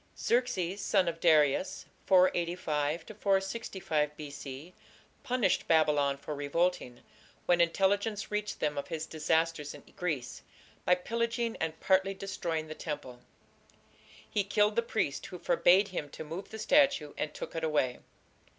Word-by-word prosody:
Xerxes, 200 Hz, -6 st, 0 dB
son 190 Hz, -2 st, +2 dB
of 165 Hz, -1 st, -2 dB
Darius 155 Hz, +1 st, +3 dB, 0.2 s
(485 170 Hz, -4 st, +2 dB, 0.2 s
465 190 Hz, -7 st, 0 dB
B.C.), 145 Hz, +2 st, -8 dB, 0.5 s
punished 250 Hz, -8 st, +1 dB
Babylon 150 Hz, -3 st, +3 dB
for 145 Hz, +2 st, -6 dB
revolting, 145 Hz, -3 st, -1 dB, 0.4 s
when 175 Hz, -1 st, +4 dB
intelligence 200 Hz, +5 st, +1 dB
reached 210 Hz, 0 st, -2 dB
them 150 Hz, -1 st, 0 dB
of 140 Hz, -, -6 dB
his 160 Hz, -1 st, -4 dB
disasters 160 Hz, -1 st, 0 dB
in -, -, -13 dB
Greece, 155 Hz, -9 st, -3 dB, 0.4 s
by 180 Hz, -, +5 dB
pillaging 230 Hz, +4 st, -2 dB
and 160 Hz, 0 st, -3 dB
partly 190 Hz, +1 st, +2 dB
destroying 170 Hz, -5 st, -3 dB
the 155 Hz, -, -7 dB
temple. 145 Hz, -6 st, -6 dB, 1.1 s
"He 205 Hz, -, 0 dB
killed 210 Hz, +1 st, +2 dB
the 235 Hz, -, +3 dB
priest 220 Hz, -11 st, -2 dB
who 180 Hz, -, -8 dB
forbade 190 Hz, +3 st, +4 dB
him 155 Hz, -6 st, -4 dB
to 160 Hz, -, -8 dB
move 165 Hz, +5 st, -7 dB
the 220 Hz, -, -7 dB
statue, 220 Hz, -, +3 dB
and 150 Hz, -, -3 dB
took -, -, -8 dB
it 165 Hz, -, -3 dB
away." 145 Hz, -6 st, +1 dB
170 Hz, 135 wpm, -31 LUFS, 150-195 Hz, 1.1 s, by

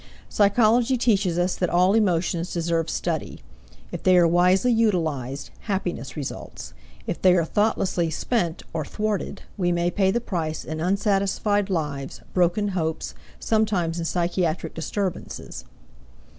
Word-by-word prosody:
Psychology 230 Hz, +4 st, +3 dB
teaches 200 Hz, -7 st, +2 dB
us 180 Hz, +1 st, +1 dB
that 180 Hz, -, -1 dB
all 180 Hz, +3 st, +3 dB
emotions 175 Hz, -5 st, +1 dB
deserve 165 Hz, -1 st, -1 dB
study; -, -, -3 dB, 0.5 s
if -, -, -5 dB
they 185 Hz, -1 st, +5 dB
are 175 Hz, -1 st, +6 dB
wisely 180 Hz, +7 st, +3 dB
utilized, 160 Hz, -, 0 dB
happiness 180 Hz, -, -3 dB
results; 140 Hz, -3 st, -6 dB, 0.3 s
if -, -, -4 dB
they 185 Hz, -1 st, +6 dB
are 170 Hz, -, +2 dB
thoughtlessly 190 Hz, -3 st, +1 dB
spent 170 Hz, 0 st, -1 dB
or 160 Hz, -1 st, -1 dB
thwarted, 210 Hz, +5 st, -3 dB
we 175 Hz, -3 st, +1 dB
may 175 Hz, 0 st, +1 dB
pay 190 Hz, +1 st, +2 dB
the 235 Hz, -, +1 dB
price 165 Hz, -9 st, -3 dB
in 155 Hz, 0 st, -5 dB
unsatisfied 200 Hz, +2 st, +1 dB
lives, 150 Hz, -6 st, -3 dB
broken 180 Hz, +3 st, +2 dB
hopes, 160 Hz, -4 st, -2 dB, 0.3 s
sometimes 195 Hz, -7 st, 0 dB
in 165 Hz, -, -3 dB
psychiatric 175 Hz, -1 st, -1 dB
disturbances. 185 Hz, +3 st, -4 dB
180 Hz, 130 wpm, -24 LUFS, 165-205 Hz, 0.5 s, are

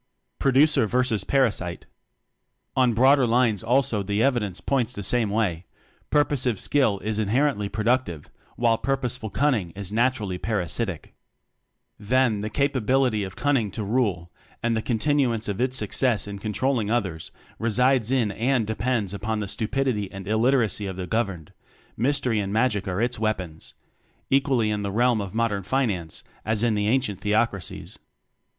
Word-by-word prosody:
Producer 135 Hz, -2 st, +4 dB
Versus 125 Hz, -4 st, +1 dB
Parasite. 100 Hz, -8 st, 0 dB, 0.9 s
On 125 Hz, -3 st, +3 dB
broader 130 Hz, +2 st, +5 dB
lines 115 Hz, -3 st, +2 dB
also 120 Hz, -2 st, +2 dB
the 100 Hz, +3 st, 0 dB
evidence 115 Hz, -9 st, 0 dB
points 125 Hz, -3 st, -1 dB
the 100 Hz, -, -6 dB
same 115 Hz, +2 st, +1 dB
way: 95 Hz, -5 st, -1 dB, 0.4 s
purposive 130 Hz, -7 st, +1 dB
skill 130 Hz, -9 st, +2 dB
is 110 Hz, 0 st, -2 dB
inherently 110 Hz, 0 st, +1 dB
productive, 110 Hz, -, -1 dB, 0.3 s
while 115 Hz, -1 st, +2 dB
purpose 135 Hz, -3 st, -1 dB
ful 110 Hz, -3 st, -6 dB
cunning 120 Hz, -8 st, +1 dB
is 100 Hz, -1 st, -5 dB
naturally 110 Hz, -5 st, 0 dB
parasitic. 100 Hz, -3 st, -2 dB, 0.9 s
Then, 115 Hz, +1 st, +2 dB
the 105 Hz, +1 st, -3 dB
capability 130 Hz, -3 st, +1 dB
of 95 Hz, 0 st, -7 dB
cunning 135 Hz, -8 st, +1 dB
to 105 Hz, -, -5 dB
rule, 100 Hz, -6 st, -1 dB, 0.3 s
and 115 Hz, -1 st, +1 dB
the 110 Hz, -, 0 dB
continuance 120 Hz, -1 st, 0 dB
of 100 Hz, +2 st, -3 dB
its 130 Hz, +1 st, 0 dB
suc 105 Hz, -4 st, -4 dB
cess 125 Hz, -5 st, +2 dB
in 100 Hz, -1 st, -6 dB
controlling 110 Hz, +2 st, -1 dB
others, 95 Hz, -9 st, -2 dB, 0.3 s
resides 120 Hz, +1 st, +2 dB
in 125 Hz, -6 st, +1 dB
and 120 Hz, +3 st, 0 dB
depends 110 Hz, -2 st, -1 dB
upon 110 Hz, +2 st, -2 dB
the 105 Hz, -1 st, -3 dB
stupidity 110 Hz, -1 st, -1 dB
and 95 Hz, 0 st, -8 dB
il 110 Hz, +1 st, +1 dB
literacy 115 Hz, -5 st, +1 dB
of 95 Hz, -, -5 dB
the 95 Hz, 0 st, -4 dB
governed: 95 Hz, -7 st, -3 dB, 0.4 s
mystery 125 Hz, -2 st, 0 dB
and 100 Hz, -1 st, -2 dB
magic 110 Hz, -3 st, +1 dB
are 95 Hz, +4 st, -1 dB
its 120 Hz, -1 st, -1 dB
weapons 95 Hz, -7 st, -3 dB, 0.6 s
equally 130 Hz, -5 st, +2 dB
in 105 Hz, -1 st, -2 dB
the 100 Hz, -1 st, -3 dB
realm 120 Hz, +1 st, +2 dB
of 100 Hz, 0 st, -7 dB
modern 115 Hz, -3 st, 0 dB
Finance 95 Hz, -7 st, -2 dB, 0.2 s
as 110 Hz, 0 st, 0 dB
in 120 Hz, -2 st, +2 dB
the 105 Hz, 0 st, 0 dB
ancient 110 Hz, -5 st, 0 dB
Theocracies. 105 Hz, -3 st, -1 dB
110 Hz, 155 wpm, -24 LUFS, 100-125 Hz, 0.9 s, broader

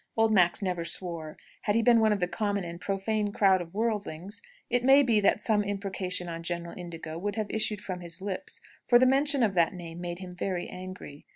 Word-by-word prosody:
Old 225 Hz, 0 st, +3 dB
Max 180 Hz, 0 st, +3 dB
never 180 Hz, -3 st, -1 dB
swore. 165 Hz, -2 st, +2 dB, 0.2 s
Had 205 Hz, -, 0 dB
he 230 Hz, -, +2 dB
been 235 Hz, -1 st, +5 dB
one 220 Hz, -1 st, +3 dB
of 210 Hz, -, +1 dB
the 180 Hz, -, 0 dB
common 205 Hz, 0 st, -2 dB
and 170 Hz, 0 st, -8 dB
profane 205 Hz, +2 st, -1 dB
crowd 195 Hz, -2 st, +3 dB
of 170 Hz, +2 st, -10 dB
worldlings, 205 Hz, -4 st, -3 dB, 0.3 s
it 245 Hz, 0 st, +1 dB
may 270 Hz, +2 st, +6 dB
be 230 Hz, -5 st, +3 dB
that 205 Hz, +1 st, +2 dB
some 210 Hz, -2 st, +2 dB
imprecation 195 Hz, -3 st, -3 dB
on 165 Hz, -1 st, -5 dB
General 170 Hz, 0 st, -4 dB
Indigo 165 Hz, -2 st, -7 dB
would 205 Hz, +2 st, -3 dB
have 215 Hz, -2 st, -3 dB
issued 215 Hz, -2 st, -1 dB
from 185 Hz, -3 st, -5 dB
his 170 Hz, 0 st, -6 dB
lips; 190 Hz, -1 st, -5 dB, 0.3 s
for 240 Hz, -, +7 dB
the 255 Hz, -, +4 dB
mention 275 Hz, +1 st, +4 dB
of 210 Hz, -4 st, +2 dB
that 170 Hz, -1 st, +2 dB
name 170 Hz, -1 st, -8 dB
made 175 Hz, -1 st, -4 dB
him 185 Hz, -1 st, -8 dB
very 180 Hz, 0 st, -3 dB
angry. 185 Hz, -5 st, -10 dB
195 Hz, 215 wpm, -28 LUFS, 175-215 Hz, 0.3 s, for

